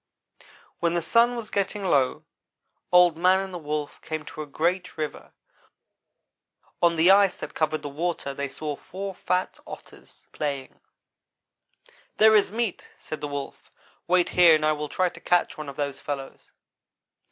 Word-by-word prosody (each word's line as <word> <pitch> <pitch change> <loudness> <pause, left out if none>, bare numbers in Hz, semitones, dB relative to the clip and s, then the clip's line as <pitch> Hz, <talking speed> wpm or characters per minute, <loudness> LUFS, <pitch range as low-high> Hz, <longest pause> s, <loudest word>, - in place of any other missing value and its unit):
"When 170 0 +1
the 170 - +1
sun 235 +6 +3
was 230 -3 -6
getting 200 +1 -1
low 140 -8 +1 0.7
Old 180 -2 +6
man 185 +2 +4
and 190 -1 -5
the 175 - -5
Wolf 150 -1 -4
came 155 -1 -5
to - - -8
a 150 - -6
great 175 +5 -1
river. 155 -1 -5 1.5
On 170 -1 +4
the 165 +3 +5
ice 200 -1 +5
that - - -7
covered 155 0 -1
the - - -4
water, 150 -1 -3
they 140 +1 -3
saw 150 +2 -5
four 195 +6 -7
fat 180 0 -2
Otters - - -13
playing. 140 -3 -4 1.4
"'There 220 0 +7
is 210 -3 +4
meat,' 225 -2 -3
said 155 - -7
the 145 - -3
Wolf; 145 -1 -7 0.4
'wait 180 0 +3
here 175 -3 +6
and 155 0 0
I 155 - +4
will 150 -1 -3
try 185 +5 +1
to - - -8
catch 175 0 +1
one 155 -2 -7
of 140 - -9
those 140 -1 -3
fellows.' 140 -2 -7
165 Hz, 165 wpm, -25 LUFS, 150-185 Hz, 1.5 s, There